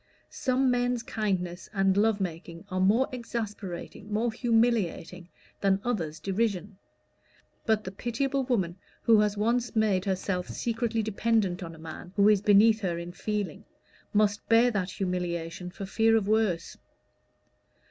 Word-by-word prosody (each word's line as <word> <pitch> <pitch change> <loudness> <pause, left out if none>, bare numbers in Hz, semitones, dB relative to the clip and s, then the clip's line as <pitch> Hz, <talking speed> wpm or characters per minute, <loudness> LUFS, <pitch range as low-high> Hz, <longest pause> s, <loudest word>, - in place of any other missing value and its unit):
Some 260 0 +1
men's 245 -1 0
kindness 185 -6 -2
and 195 -1 +3
love 210 +1 +3
making 170 -1 -5
are 185 - -1
more 215 +8 +4
exasperating, 210 -5 -6
more 225 +3 +1
humiliating 220 -7 0 0.3
than 195 -1 +2
others' 165 -11 -2
derision; 200 -1 -2 0.9
but 220 -1 +2
the 185 - -6
pitiable 260 +6 -1
woman 190 -9 0 0.3
who 225 -2 +6
has 210 -1 +1
once 235 +3 0
made 210 -4 +2
herself 185 -1 -2
secretly 230 -1 -1
dependent 215 -3 0
on 165 -2 -7
a - - -14
man 165 +3 -9
who 200 0 +5
is 210 -2 +4
beneath 210 +2 +5
her 175 -4 -1
in 170 +1 -6
feeling, 210 +1 -3 0.5
must 210 0 +1
bear 230 +2 +5
that 195 -4 -1
humiliation 180 -2 -3
for 195 +2 -7
fear 225 +3 +3
of 205 -3 -1
worse. 210 -6 0
205 Hz, 140 wpm, -28 LUFS, 185-225 Hz, 0.9 s, who